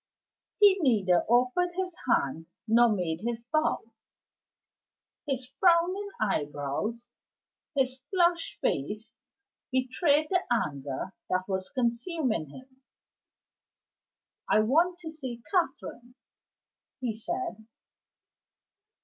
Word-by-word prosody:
He 400 -2 +7
neither 200 - +3
offered 255 +10 +2
his 370 -1 -2
hand 160 - +1 0.2
nor 235 +2 +6
made 175 -5 -1
his 235 0 -3
bow. 310 +5 0 1.4
His 265 -2 -2
frowning 355 +7 +2
eyebrows, 195 +6 -2 0.7
his 260 -1 +1
flushed 345 -3 +1
face, 210 - -2 0.6
betrayed 285 +4 +2
the 365 -1 +3
anger 145 - -2 0.2
that 185 0 0
was 190 -1 -2
consuming 240 - -1
him. 260 - -14 1.7
"I 215 - +5
want 330 +11 +3
to 320 -2 -6
see 255 -7 -7
Catherine," 265 -8 -2 0.8
he 240 -4 -2
said. 340 - -4
250 Hz, 90 wpm, -29 LUFS, 210-330 Hz, 1.7 s, He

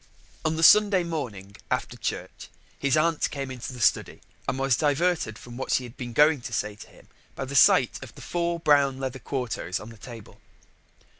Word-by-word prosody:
On 155 0 0
the 165 - -1
Sunday 200 0 +6
morning, 115 - -5
after - - -2
church, - - -5 0.3
his 140 +1 +2
aunt 160 0 +1
came 135 -2 -5
into 125 -1 -6
the 125 - -10
study 110 - +1 0.3
and - - -2
was 135 -2 +2
diverted 150 -5 0
from 120 +1 -11
what 130 - -5
she 130 - +2
had 120 0 -10
been 125 -3 -6
going 150 +3 +4
to 120 - -7
say 105 -1 -2
to 105 - -13
him - - -19 0.3
by 135 - -4
the 135 - -7
sight 130 -2 +5
of 125 - -12
the - - -12
four 170 -1 -2
brown 145 -4 +3
leather 130 -1 -4
quartos 120 -10 -3
on 110 - -10
the 115 - -13
table. 115 -1 -12
135 Hz, 200 wpm, -26 LUFS, 120-155 Hz, 0.3 s, Sunday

